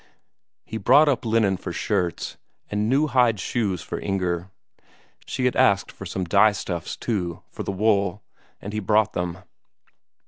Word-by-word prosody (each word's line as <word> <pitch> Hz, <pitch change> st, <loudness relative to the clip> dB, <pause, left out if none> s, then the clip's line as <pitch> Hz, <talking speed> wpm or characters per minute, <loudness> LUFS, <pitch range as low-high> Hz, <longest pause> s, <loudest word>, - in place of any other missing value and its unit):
He 110 Hz, -, -5 dB
brought 145 Hz, +9 st, +5 dB
up 135 Hz, -4 st, +1 dB
linen 110 Hz, -4 st, +2 dB
for -, -, -6 dB
shirts, 85 Hz, -2 st, -2 dB, 0.4 s
and 105 Hz, +1 st, 0 dB
new 140 Hz, +4 st, +3 dB
hide 125 Hz, -7 st, +3 dB
shoes 100 Hz, -5 st, -1 dB
for -, -, -5 dB
Inger. 90 Hz, -2 st, -2 dB, 0.8 s
She 130 Hz, -, -2 dB
had 125 Hz, -, +2 dB
asked 100 Hz, -2 st, +3 dB
for -, -, -9 dB
some 95 Hz, -, -3 dB
dye 100 Hz, +4 st, +5 dB
stuffs, 85 Hz, -4 st, -4 dB
too, 90 Hz, -8 st, -3 dB
for -, -, -7 dB
the -, -, -3 dB
wool, 100 Hz, -1 st, +1 dB, 0.4 s
and 100 Hz, -, -7 dB
he 110 Hz, -, -1 dB
brought 105 Hz, 0 st, +2 dB
them. 90 Hz, +1 st, -3 dB
100 Hz, 160 wpm, -24 LUFS, 90-110 Hz, 0.8 s, brought